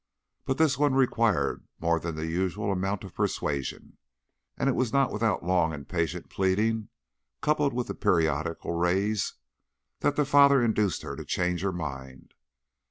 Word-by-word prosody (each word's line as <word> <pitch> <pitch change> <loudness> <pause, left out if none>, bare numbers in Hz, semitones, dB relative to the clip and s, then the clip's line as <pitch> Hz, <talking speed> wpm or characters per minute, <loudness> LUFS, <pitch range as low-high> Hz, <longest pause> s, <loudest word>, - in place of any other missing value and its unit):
But 135 - -1
this 155 -5 +2
one 145 -2 +3
required 115 -6 +2 0.2
more 85 0 +1
than 85 -1 -4
the 80 +1 -3
usual 95 +5 -1
amount 95 +1 -2
of 95 - -10
persuasion, 70 -2 -3 0.6
and - - 0
it 135 - +3
was 125 -3 0
not 140 0 +2
without 110 -4 0
long 85 -3 +2
and 70 -2 -8
patient 85 0 -2
pleading, 105 +3 0 0.5
coupled 150 -1 +1
with 125 -1 -1
the - - -5
periodical 80 0 0
raise, 95 +4 0 0.6
that 145 - +1
the 150 - +2
father 140 0 +6
induced 105 -5 +1
her - - -5
to - - -7
change 90 -1 -1
her 100 0 0
mind. 65 -6 -7
95 Hz, 160 wpm, -27 LUFS, 85-120 Hz, 0.6 s, father